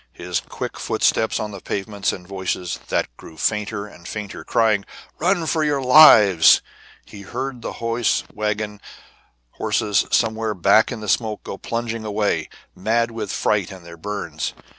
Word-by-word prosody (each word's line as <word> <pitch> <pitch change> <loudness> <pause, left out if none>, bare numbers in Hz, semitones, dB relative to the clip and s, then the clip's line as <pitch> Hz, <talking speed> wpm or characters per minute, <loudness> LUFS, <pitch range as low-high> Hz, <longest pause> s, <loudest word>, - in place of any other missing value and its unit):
He - - -13
heard - - -3
quick - - -6
footsteps 110 - +1
on 105 -1 -4
the 100 -2 -9
pavements, 100 0 -2
and 90 -2 -9
voices, 95 -2 -3
that - - -1
grew 80 - -13
fainter 105 +3 -1
and 85 -4 -13
fainter, 105 -2 -6
crying: 110 -3 +2 0.4
"Run 175 0 +1
for 160 0 0
your 145 -2 +1
lives!" 110 - +7 0.4
He 100 - -11
heard 125 +5 -5
the - - -5
hose 115 0 0
wagon 105 -1 -3 0.7
horses 105 -2 0
somewhere 110 -2 +1
back 100 +6 +4
in 115 -3 -5
the 105 - -6
smoke 110 +1 0
go - - -6
plunging 115 -1 -3
away, 105 -1 -1 0.3
mad 115 +4 0
with 110 -3 -5
fright 100 -4 0
and 95 -3 -11
their 85 -1 -10
burns. 100 +4 -5
105 Hz, 160 wpm, -21 LUFS, 100-115 Hz, 0.7 s, lives